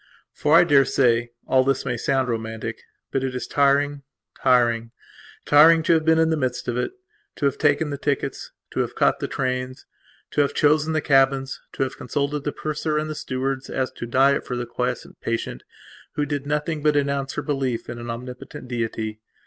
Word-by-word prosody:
For, 150 Hz, +2 st, +2 dB
I 175 Hz, -, +8 dB
daresay, 135 Hz, -6 st, +3 dB, 0.2 s
all 130 Hz, 0 st, +3 dB
this 135 Hz, 0 st, 0 dB
may 120 Hz, -, -1 dB
sound 130 Hz, +2 st, 0 dB
romantic, 110 Hz, -1 st, -4 dB, 0.3 s
but 135 Hz, -, -1 dB
it 130 Hz, -1 st, -2 dB
is 125 Hz, -, -3 dB
tiring, 145 Hz, 0 st, +2 dB, 0.4 s
tiring, 120 Hz, -3 st, +3 dB, 0.6 s
tiring 160 Hz, +3 st, +7 dB
to 170 Hz, -, +4 dB
have 160 Hz, -1 st, +2 dB
been 160 Hz, 0 st, +4 dB
in 160 Hz, 0 st, +3 dB
the 160 Hz, -, +1 dB
midst 130 Hz, -3 st, -2 dB
of 120 Hz, -, -1 dB
it; 125 Hz, -, -2 dB, 0.4 s
to 145 Hz, -, -2 dB
have 140 Hz, 0 st, 0 dB
taken 145 Hz, 0 st, +2 dB
the 140 Hz, -, -4 dB
tickets; 140 Hz, -2 st, -2 dB, 0.2 s
to -, -, -3 dB
have -, -, -1 dB
caught -, -, +2 dB
the -, -, -2 dB
trains; 130 Hz, 0 st, -3 dB, 0.5 s
to -, -, +2 dB
have 140 Hz, -, 0 dB
chosen 155 Hz, +1 st, +3 dB
the 155 Hz, -, +1 dB
cabins; 135 Hz, -1 st, +2 dB
to -, -, 0 dB
have 130 Hz, -, -4 dB
consulted 140 Hz, +2 st, -2 dB
the 145 Hz, -, 0 dB
purser 155 Hz, +1 st, -2 dB
and 155 Hz, 0 st, -2 dB
the -, -, -2 dB
stewards 130 Hz, -1 st, -3 dB
as 130 Hz, -1 st, -1 dB
to 120 Hz, -, -7 dB
diet 135 Hz, +3 st, +3 dB
for 125 Hz, -, -4 dB
the 120 Hz, -, -3 dB
quiescent 120 Hz, -, -4 dB
patient 115 Hz, -, -3 dB, 0.5 s
who 150 Hz, -, -1 dB
did 145 Hz, -1 st, -3 dB
nothing 150 Hz, +1 st, -1 dB
but 150 Hz, 0 st, +2 dB
announce 140 Hz, -1 st, 0 dB
her 150 Hz, -, -3 dB
belief 130 Hz, -5 st, -2 dB
in 120 Hz, 0 st, -6 dB
an 120 Hz, 0 st, -7 dB
Omnipotent 125 Hz, +2 st, -7 dB
Deity. 115 Hz, -3 st, -3 dB
135 Hz, 195 wpm, -23 LUFS, 125-145 Hz, 0.6 s, I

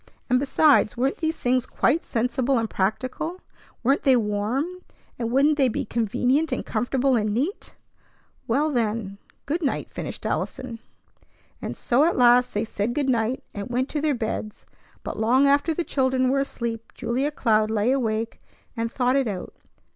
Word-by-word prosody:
And, 250 Hz, -, +5 dB
besides, 280 Hz, -3 st, +3 dB
weren't 265 Hz, +3 st, 0 dB
these 320 Hz, -1 st, -1 dB
things 250 Hz, 0 st, +1 dB
quite 330 Hz, -, +1 dB
sensible 250 Hz, +2 st, 0 dB
and 225 Hz, -1 st, 0 dB
practical? 255 Hz, -, -2 dB, 0.4 s
Weren't 270 Hz, +4 st, +3 dB
they 265 Hz, -2 st, +5 dB
warm, 215 Hz, +5 st, 0 dB, 0.5 s
and 230 Hz, -1 st, -1 dB
wouldn't 280 Hz, +4 st, +3 dB
they 270 Hz, -, +5 dB
be 235 Hz, -, -2 dB
convenient 250 Hz, +8 st, +1 dB
and -, -, -2 dB
comfortable 255 Hz, +3 st, +1 dB
and 215 Hz, -2 st, +1 dB
neat? 295 Hz, -, -3 dB, 0.7 s
Well, 290 Hz, +7 st, +1 dB
then, 215 Hz, -5 st, -2 dB, 0.3 s
"Good 320 Hz, +5 st, -1 dB
night," 280 Hz, -, -2 dB
finished -, -, -6 dB
Allison. 235 Hz, -3 st, -3 dB, 0.8 s
And -, -, -5 dB
so 255 Hz, +3 st, +2 dB
at 340 Hz, -, +1 dB
last 245 Hz, 0 st, +5 dB
they 210 Hz, +2 st, 0 dB
said 220 Hz, +2 st, -2 dB
"Good 285 Hz, -2 st, 0 dB
night," 235 Hz, +1 st, 0 dB
and 200 Hz, +1 st, -6 dB
went 255 Hz, +2 st, -1 dB
to 300 Hz, -, -2 dB
their 300 Hz, -2 st, +1 dB
beds; 220 Hz, -2 st, -4 dB, 0.4 s
but -, -, -5 dB
long 250 Hz, +5 st, +4 dB
after 285 Hz, +3 st, +3 dB
the 340 Hz, +2 st, -1 dB
children 260 Hz, -3 st, +1 dB
were 275 Hz, +1 st, +2 dB
asleep 235 Hz, -4 st, -4 dB
Julia 260 Hz, +5 st, -1 dB
Cloud 220 Hz, -7 st, +2 dB
lay 220 Hz, +2 st, +1 dB
awake 225 Hz, -4 st, -1 dB, 0.3 s
and 230 Hz, -1 st, -2 dB
thought 250 Hz, 0 st, +1 dB
it 270 Hz, -3 st, +2 dB
out. 190 Hz, -4 st, -5 dB
250 Hz, 165 wpm, -24 LUFS, 225-275 Hz, 0.8 s, And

